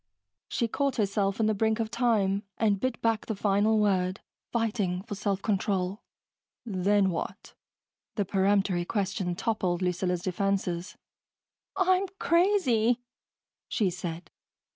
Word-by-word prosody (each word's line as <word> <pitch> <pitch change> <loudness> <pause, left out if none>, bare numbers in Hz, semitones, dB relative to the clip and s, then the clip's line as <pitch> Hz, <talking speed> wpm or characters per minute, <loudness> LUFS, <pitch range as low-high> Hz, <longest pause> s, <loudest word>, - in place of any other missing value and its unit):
She 235 - 0
caught 275 +4 0
herself 200 -1 0
in 220 - +3
the 215 - +3
brink 220 +2 +1
of 225 -1 -2
time 210 -5 +2 0.2
and 210 -3 +2
bit 255 +3 -1
back 225 -2 +1
the 220 - -2
final 205 +2 +2
word, 190 -3 +1 0.3
fighting 210 -6 0
for 215 - -6
self 200 -1 -2
control. 195 -1 0 0.6
"Then 200 -1 +2
what?" 165 - -5 0.6
The 205 - 0
peremptory 195 -2 +2
question 190 -2 -2
toppled 185 -4 -1
Lucilla's 180 0 0
defenses. 185 -1 -1 0.8
"I'm 375 +1 +3
crazy," 260 - +3 0.6
she 200 -6 +1
said. 170 -2 -6
200 Hz, 120 wpm, -28 LUFS, 185-225 Hz, 0.8 s, in